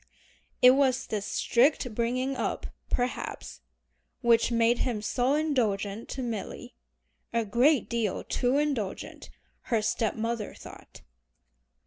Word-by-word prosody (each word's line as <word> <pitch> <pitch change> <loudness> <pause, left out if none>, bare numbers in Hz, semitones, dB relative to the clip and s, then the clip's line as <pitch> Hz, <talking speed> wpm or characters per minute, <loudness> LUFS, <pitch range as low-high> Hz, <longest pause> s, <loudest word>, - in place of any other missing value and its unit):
It 250 - +10
was 265 -1 +2
this 205 -2 -3
strict 250 -1 +2
bringing 255 +4 -1
up, - - -2 0.2
perhaps, 245 0 -3 0.6
which 235 -1 +4
made 235 +1 +3
him 235 -4 -1
so 250 +5 +1
indulgent 225 -9 -1
to 265 - -4
Milly, 225 -5 -5 0.6
a 230 -1 0
great 250 +8 +3
deal 230 -5 -1
too 250 +2 0
indulgent 275 -10 -3 0.4
her 225 -3 0
step 220 0 0
mother 225 -1 -3
thought. - - -13
235 Hz, 115 wpm, -28 LUFS, 220-260 Hz, 0.6 s, It